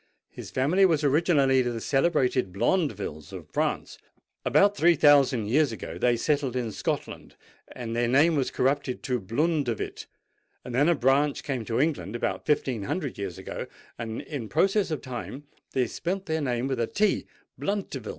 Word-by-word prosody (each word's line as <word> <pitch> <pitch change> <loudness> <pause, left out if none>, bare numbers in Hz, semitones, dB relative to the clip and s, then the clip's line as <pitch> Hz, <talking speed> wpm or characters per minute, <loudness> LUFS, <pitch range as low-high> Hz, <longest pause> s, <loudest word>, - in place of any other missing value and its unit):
"His - - -9
family 155 +9 +2
was 160 -5 +3
originally 140 -3 +3
the 120 -2 -2
celebrated 130 - +1
Blondevilles 100 - -1
of - - -9
France: - - -2 0.4
about 200 +1 +4
three 170 0 +4
thousand 140 -6 +5
years 140 +5 +2
ago 110 - -7
they 120 -1 +2
settled 140 0 0
in 120 -3 -2
Scotland, - - -4 0.4
and 115 -2 -5
their 120 0 +1
name 145 +7 +4
was 135 -3 0
corrupted 135 -1 -1
to 125 -2 -1
Blundevil;—then 125 - -2
a 170 - +4
branch 140 +2 +2
came 135 -5 -3
to 115 +2 -1
England 140 -8 -1
about 120 - -3
fifteen 135 -6 +1
hundred 145 - -3
years 95 -4 -4
ago, - - -6 0.3
and 115 -1 -4
in 130 -8 -6
process 195 - +2
of 155 - -3
time 130 +2 -6 0.3
they 130 -2 +2
spelt 185 +10 -3
their 160 0 -1
name 125 -3 -1
with 135 -2 -2
a 115 - +1
t—Bluntevil. 205 -1 -2
135 Hz, 155 wpm, -27 LUFS, 120-155 Hz, 0.4 s, thousand